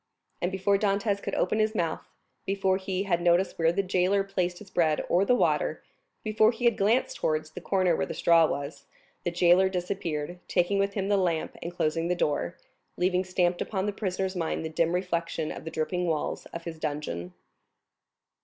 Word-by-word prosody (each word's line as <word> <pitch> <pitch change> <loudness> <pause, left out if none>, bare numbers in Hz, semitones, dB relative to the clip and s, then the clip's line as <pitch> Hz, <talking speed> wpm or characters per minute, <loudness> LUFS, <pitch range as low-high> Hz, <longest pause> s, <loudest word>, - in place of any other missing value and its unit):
And 175 - 0
before 195 +1 +1
Dantès 200 0 +1
could - - -3
open 215 - +1
his 215 +1 +1
mouth—before 190 +2 -2
he 190 0 -2
had 175 -3 0
noticed 175 +2 +2
where 165 0 +4
the 200 +3 0
jailer 185 +1 +2
placed 180 -3 -2
his 200 -1 -13
bread 160 -4 +1
or 185 +3 +3
the 250 - +4
water—before 220 - 0
he 235 +2 -4
had 235 -2 +5
glanced 220 +6 +1
towards 155 0 -1
the - - -8
corner 185 -3 +2
where - - -1
the - - -5
straw 165 -1 +5
was, 140 +1 -5 0.4
the - - 0
jailer 175 +2 +4
disappeared, 180 -3 -3
taking 185 +2 +1
with 200 0 0
him 195 -2 -1
the 205 0 +3
lamp 170 -4 0
and 175 +1 -6
closing 165 +1 0
the 180 - +1
door, 155 0 -1 0.4
leaving 180 0 +2
stamped 180 -1 0
upon 190 -2 -2
the 205 - -1
prisoner's 190 -1 -2
mind 165 -2 -2
the - - -3
dim 165 +2 +1
reflection 170 -3 -2
of - - -8
the - - -3
dripping 180 +3 -1
walls 160 -2 -2
of 170 - -8
his 165 -1 -7
dungeon. 90 - -4
180 Hz, 185 wpm, -28 LUFS, 165-195 Hz, 0.4 s, had